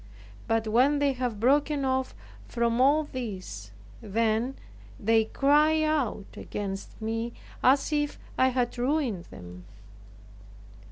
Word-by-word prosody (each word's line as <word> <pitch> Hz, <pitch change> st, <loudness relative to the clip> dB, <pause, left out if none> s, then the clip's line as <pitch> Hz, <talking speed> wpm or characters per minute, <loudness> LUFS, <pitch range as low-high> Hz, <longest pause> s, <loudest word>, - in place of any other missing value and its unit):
But 225 Hz, -1 st, +1 dB
when 255 Hz, +7 st, +3 dB
they 285 Hz, -1 st, +2 dB
have 245 Hz, -4 st, -3 dB
broken 285 Hz, +3 st, +2 dB
off 260 Hz, 0 st, -1 dB, 0.3 s
from 235 Hz, 0 st, 0 dB
all 290 Hz, +4 st, +4 dB
this, 190 Hz, -, -6 dB, 0.3 s
then 225 Hz, +4 st, 0 dB, 0.4 s
they 225 Hz, +1 st, +3 dB
cry 300 Hz, +6 st, +3 dB
out 290 Hz, -10 st, 0 dB
against 195 Hz, -1 st, -6 dB
me, 225 Hz, +1 st, -3 dB, 0.3 s
as 275 Hz, +4 st, +3 dB
if 295 Hz, -1 st, 0 dB, 0.2 s
I 260 Hz, -, +4 dB
had 250 Hz, -1 st, -1 dB
ruined 250 Hz, -, 0 dB
them. 90 Hz, 0 st, -11 dB
245 Hz, 115 wpm, -27 LUFS, 220-280 Hz, 0.4 s, all